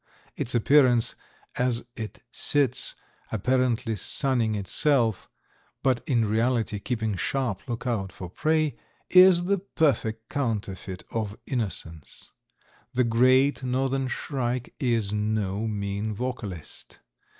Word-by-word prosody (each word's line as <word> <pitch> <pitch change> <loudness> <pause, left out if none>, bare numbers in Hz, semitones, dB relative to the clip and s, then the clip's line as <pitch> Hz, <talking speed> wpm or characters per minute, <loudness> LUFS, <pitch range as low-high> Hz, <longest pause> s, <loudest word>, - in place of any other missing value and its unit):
Its 125 - -2
appearance 125 -1 +4 0.4
as 125 -2 +1
it 110 -2 -7
sits 135 -3 +1 0.4
apparently 120 +1 +1
sunning 115 +2 +1
itself, 115 +2 +1 0.5
but 130 -3 +2
in 120 -4 +3
reality 110 -1 +1
keeping 110 -2 -2
sharp 120 +1 -1
lookout 115 -5 -2
for 90 - -8
prey, 155 - 0 0.4
is 185 -1 +8
the 200 +1 +1
perfect 125 - 0
counterfeit 100 - -3
of 110 -2 -3
innocence. 95 - -4 0.6
The 125 - +4
Great 130 +4 +4
Northern 130 +1 0
Shrike 125 -2 -3
is 115 -7 0
no 105 0 -1
mean 105 0 -3
vocalist. 105 -8 -6
120 Hz, 105 wpm, -26 LUFS, 105-130 Hz, 0.6 s, is